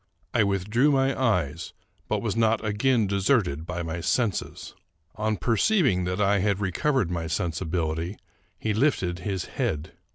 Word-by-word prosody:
I 115 Hz, -, +4 dB
withdrew 105 Hz, +7 st, +2 dB
my 135 Hz, -1 st, +2 dB
eyes, 85 Hz, -, 0 dB, 0.3 s
but 105 Hz, 0 st, -1 dB
was 110 Hz, -3 st, -1 dB
not 110 Hz, -1 st, +2 dB
again 110 Hz, +2 st, +2 dB
deserted 95 Hz, -, +1 dB
by 85 Hz, 0 st, -3 dB
my 80 Hz, +1 st, -4 dB
senses. 115 Hz, +2 st, -1 dB, 0.4 s
On 110 Hz, 0 st, -1 dB
perceiving 115 Hz, -, +2 dB
that 90 Hz, +2 st, -2 dB
I 100 Hz, 0 st, +3 dB
had 100 Hz, 0 st, +1 dB
recovered 105 Hz, -, 0 dB
my 85 Hz, -2 st, -2 dB
sensibility, 80 Hz, +1 st, -2 dB, 0.4 s
he 110 Hz, -, -1 dB
lifted 100 Hz, -8 st, +1 dB
his 95 Hz, 0 st, -3 dB
head. 75 Hz, 0 st, -3 dB
100 Hz, 140 wpm, -26 LUFS, 85-115 Hz, 0.4 s, I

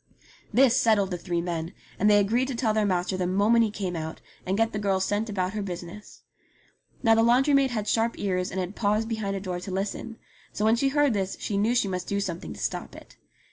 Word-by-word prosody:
This 250 Hz, +2 st, +5 dB
settled 210 Hz, -6 st, +3 dB
the 180 Hz, -, -2 dB
three 170 Hz, -1 st, -2 dB
men, 170 Hz, 0 st, -4 dB, 0.3 s
and 210 Hz, -, +4 dB
they 205 Hz, -, +6 dB
agreed 225 Hz, +6 st, +2 dB
to 270 Hz, -, -3 dB
tell 230 Hz, -2 st, +1 dB
their 215 Hz, -1 st, +1 dB
master 185 Hz, 0 st, 0 dB
the 180 Hz, -1 st, -1 dB
moment 210 Hz, +5 st, +3 dB
he -, -, -1 dB
came 195 Hz, -4 st, -4 dB
out, 160 Hz, -1 st, -5 dB, 0.3 s
and 190 Hz, +2 st, 0 dB
get 225 Hz, +1 st, +1 dB
the 210 Hz, -, -2 dB
girl 195 Hz, -2 st, +1 dB
sent 205 Hz, +4 st, -1 dB
about 190 Hz, -2 st, -2 dB
her 215 Hz, -, -2 dB
business. 180 Hz, +1 st, -8 dB, 0.8 s
Now 225 Hz, -2 st, +5 dB
the 225 Hz, -, +4 dB
laundry 250 Hz, +5 st, +4 dB
maid 275 Hz, -1 st, +4 dB
had 215 Hz, -4 st, -3 dB
sharp 230 Hz, +1 st, +1 dB
ears 185 Hz, -2 st, -1 dB
and 190 Hz, -, -4 dB
had 185 Hz, +2 st, -4 dB
paused 215 Hz, +1 st, +1 dB
behind 215 Hz, -4 st, -2 dB
a -, -, -2 dB
door 185 Hz, -2 st, -4 dB
to 185 Hz, -, -8 dB
listen; 200 Hz, +4 st, -4 dB, 0.4 s
so 210 Hz, -, -1 dB
when 220 Hz, +1 st, +5 dB
she 270 Hz, +4 st, +1 dB
heard 290 Hz, -2 st, +2 dB
this 195 Hz, -2 st, -2 dB
she 205 Hz, -, -3 dB
knew 215 Hz, +5 st, +2 dB
she 225 Hz, -, +2 dB
must 185 Hz, -1 st, -4 dB
do 200 Hz, -, -1 dB
something 180 Hz, -4 st, -4 dB
to -, -, -9 dB
stop -, -, -4 dB
it. -, -, -14 dB
205 Hz, 240 wpm, -26 LUFS, 185-225 Hz, 0.8 s, they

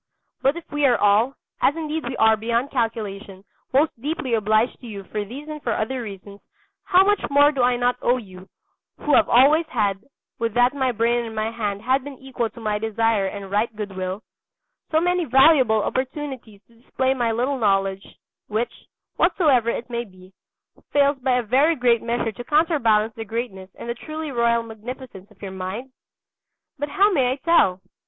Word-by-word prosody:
But 275 Hz, +5 st, +2 dB
if 340 Hz, -, -7 dB
we 295 Hz, -1 st, +2 dB
are 245 Hz, -3 st, +3 dB
all, 210 Hz, +6 st, +3 dB, 0.3 s
as 285 Hz, -, +3 dB
indeed 315 Hz, -2 st, -4 dB
we 260 Hz, -, -5 dB
are 220 Hz, 0 st, +5 dB
beyond 235 Hz, +5 st, -1 dB
calculation, 210 Hz, -5 st, -3 dB, 0.3 s
most 290 Hz, +4 st, +3 dB
deeply 285 Hz, -3 st, -3 dB
obliged 215 Hz, +2 st, +1 dB
to 245 Hz, -, -10 dB
you 200 Hz, -3 st, -7 dB
for 210 Hz, +2 st, -4 dB
these 265 Hz, +9 st, -9 dB
and 305 Hz, -1 st, -7 dB
for -, -, -1 dB
other 250 Hz, +4 st, -2 dB
reasons, 200 Hz, -2 st, -9 dB, 0.4 s
how 380 Hz, -1 st, +5 dB
much 410 Hz, 0 st, +2 dB
more 285 Hz, +1 st, +5 dB
do 275 Hz, -4 st, -2 dB
I 245 Hz, 0 st, +3 dB
not 245 Hz, 0 st, +1 dB
owe 245 Hz, +1 st, +2 dB
to 245 Hz, -, -7 dB
you, 185 Hz, -1 st, -14 dB, 0.5 s
who 295 Hz, -, -1 dB
have -, -, +5 dB
always 295 Hz, +7 st, +5 dB
had 200 Hz, -4 st, -1 dB, 0.4 s
(would 230 Hz, -1 st, -2 dB
that 245 Hz, +2 st, +4 dB
my 265 Hz, -3 st, 0 dB
brain 235 Hz, +1 st, +1 dB
and 225 Hz, -1 st, -7 dB
my 215 Hz, +1 st, -1 dB
hand 210 Hz, -3 st, -3 dB
had 260 Hz, +2 st, +1 dB
been 280 Hz, -1 st, -9 dB
equal 260 Hz, -3 st, -3 dB
to -, -, -14 dB
my 210 Hz, -2 st, -1 dB
desire 220 Hz, -2 st, +1 dB
and 195 Hz, 0 st, -7 dB
right 215 Hz, +2 st, 0 dB
good 205 Hz, -2 st, -6 dB
will) 185 Hz, +2 st, -4 dB, 0.7 s
so 315 Hz, -, +3 dB
many 355 Hz, +1 st, +1 dB
valuable 260 Hz, -5 st, +5 dB
opportunities 260 Hz, -6 st, -4 dB
to 230 Hz, +3 st, -26 dB
display 260 Hz, +1 st, 0 dB
my 240 Hz, -3 st, 0 dB
little 255 Hz, +4 st, -1 dB
knowledge, 195 Hz, -2 st, 0 dB, 0.3 s
which, 220 Hz, +3 st, -2 dB, 0.4 s
whatsoever 265 Hz, -, +3 dB
it 235 Hz, -, -3 dB
may 235 Hz, -1 st, -3 dB
be, 185 Hz, -3 st, -17 dB, 0.6 s
fails 280 Hz, -1 st, +3 dB
by 255 Hz, 0 st, +1 dB
a 250 Hz, -, 0 dB
very 275 Hz, +9 st, +3 dB
great 245 Hz, -4 st, +2 dB
measure 235 Hz, -1 st, -1 dB
to 220 Hz, +4 st, -9 dB
counterbalance 240 Hz, -8 st, +2 dB
the 225 Hz, -, -6 dB
greatness 220 Hz, -4 st, -5 dB
and -, -, -9 dB
the 235 Hz, -, -1 dB
truly 310 Hz, +5 st, -6 dB
royal 235 Hz, -1 st, +2 dB
magnificence 225 Hz, -2 st, -9 dB
of 210 Hz, -2 st, -23 dB
your 195 Hz, -, -5 dB
mind? 190 Hz, +8 st, -6 dB, 0.9 s
But 290 Hz, +1 st, -2 dB
how 400 Hz, +4 st, +3 dB
may 260 Hz, -8 st, +2 dB
I -, -, -4 dB
tell? 270 Hz, -, +2 dB
235 Hz, 190 wpm, -22 LUFS, 215-270 Hz, 0.9 s, are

